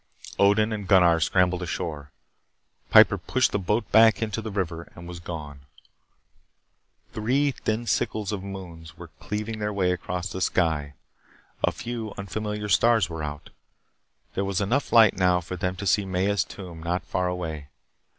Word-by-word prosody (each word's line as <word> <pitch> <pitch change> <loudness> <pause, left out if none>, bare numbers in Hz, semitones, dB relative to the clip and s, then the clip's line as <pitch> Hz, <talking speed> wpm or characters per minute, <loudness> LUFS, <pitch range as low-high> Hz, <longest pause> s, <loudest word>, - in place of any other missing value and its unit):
Odin 105 +2 +4
and 105 -3 -5
Gunnar 90 -4 +5
scrambled 90 +2 +2
ashore. 75 -4 -4 0.8
Piper - - +7
pushed - - +1
the 105 - 0
boat 105 +3 -1
back 110 -3 +6
into 110 -1 -2
the 110 - -5
river 85 -5 -4
and 85 0 -10
was 90 -1 -8
gone. 75 -5 -7 1.5
Three 135 +7 +1
thin 115 -2 -3
sickles 110 -3 -1
of 100 -3 -3
moons 90 -5 -9
were - - -10
cleaving 105 +1 -4
their 105 0 -2
way 95 -3 +1
across 90 0 -4
the 95 - -5
sky. 75 -6 0 0.7
A - - +3
few 115 -3 -6
unfamiliar 105 +1 -4
stars 105 +1 +3
were 80 -1 -5
out. 75 -1 -6 0.8
There 100 - -1
was 95 -1 -1
enough 120 +8 0
light 115 -3 +6
now 90 -1 +3
for 90 +1 -7
them 90 +1 -2
to 100 - -6
see 100 +2 +3
Maya's 95 +2 0
tomb 90 -5 -10
not 85 +2 -2
far 90 -1 -1
away. 80 -5 -4
95 Hz, 160 wpm, -25 LUFS, 85-105 Hz, 1.5 s, Piper